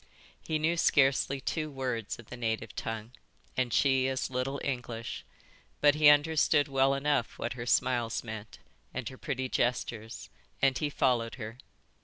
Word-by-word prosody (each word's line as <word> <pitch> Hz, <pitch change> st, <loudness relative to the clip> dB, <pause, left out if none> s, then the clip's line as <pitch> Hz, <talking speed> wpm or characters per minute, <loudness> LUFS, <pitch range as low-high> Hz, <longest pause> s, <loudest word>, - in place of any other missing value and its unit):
He 155 Hz, -, -1 dB
knew 160 Hz, +3 st, +1 dB
scarcely 140 Hz, -3 st, +3 dB
two 155 Hz, +3 st, -2 dB
words 125 Hz, -6 st, -3 dB
of 120 Hz, -, -14 dB
the -, -, -5 dB
native 110 Hz, -4 st, -3 dB
tongue 115 Hz, 0 st, -4 dB, 0.4 s
and 125 Hz, -2 st, 0 dB
she 130 Hz, 0 st, +3 dB
as 130 Hz, 0 st, -2 dB
little 130 Hz, +2 st, -2 dB
English. 115 Hz, -, -4 dB, 0.6 s
But 145 Hz, 0 st, +6 dB
he 150 Hz, 0 st, +6 dB
understood 150 Hz, 0 st, +4 dB
well 135 Hz, 0 st, +3 dB
enough 140 Hz, -3 st, 0 dB
what 120 Hz, -, -3 dB
her 120 Hz, -1 st, -6 dB
smiles 120 Hz, -2 st, +1 dB
meant, 110 Hz, -2 st, -8 dB, 0.4 s
and 130 Hz, -2 st, -3 dB
her 130 Hz, -, -11 dB
pretty 130 Hz, -2 st, -2 dB
gestures, 120 Hz, -3 st, -2 dB, 0.3 s
and 135 Hz, -1 st, +3 dB
he 145 Hz, +4 st, -1 dB
followed 120 Hz, -5 st, +1 dB
her. 115 Hz, 0 st, -8 dB
130 Hz, 155 wpm, -30 LUFS, 115-140 Hz, 0.6 s, But